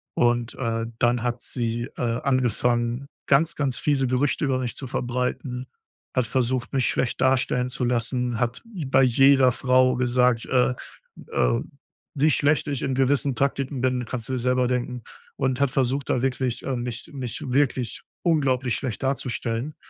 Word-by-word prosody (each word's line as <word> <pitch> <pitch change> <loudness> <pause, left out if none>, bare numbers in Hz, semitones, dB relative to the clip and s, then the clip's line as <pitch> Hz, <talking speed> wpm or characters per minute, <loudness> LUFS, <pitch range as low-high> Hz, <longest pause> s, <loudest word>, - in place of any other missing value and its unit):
und, 120 0 +1
äh, 115 -2 -2
dann 120 -1 +2
hat 120 0 -2
sie, 120 -1 -3
äh, - - -4 0.2
angefangen, 120 -1 +1 0.2
ganz, 155 +5 +3
ganz 135 -4 -1
fiese 140 -3 +1
Gerüchte 130 +4 0
über 130 -2 +1
mich 125 -2 -3
zu 135 - -5
verbreiten, 125 +1 -3 0.5
hat 130 -3 +2
versucht, 130 0 -1
mich 130 -2 +2
schlecht 120 - -1
darstellen 130 -1 +2
zu 125 -1 -2
lassen, 120 0 0
hat 120 0 -1
bei 155 - +1
jeder 130 +1 +5
Frau 130 0 +3
gesagt, 125 -1 +2
äh 125 0 +2 0.6
äh, - - +2 0.5
wie 150 +3 +3
schlecht 150 +2 +2
ich 140 -3 -2
in 135 - -1
gewissen 135 +1 +2
Praktiken 135 +1 -1
bin, 125 -1 +1
kannst 115 0 -4
du - - -2
dir 130 - -1
selber 125 +1 +2
denken 125 -1 -2 0.3
und 130 +1 0
hat 140 - +2
versucht, 135 +1 0
da 125 - +1
wirklich, 130 -2 -1
äh, 135 - -1
mich 120 -1 -5
mich 130 -4 -5
wirklich 130 -3 0 0.2
unglaublich 130 -7 +2
schlecht 130 -5 -4
darzustellen. 130 0 -2
125 Hz, 160 wpm, -24 LUFS, 120-135 Hz, 0.6 s, jeder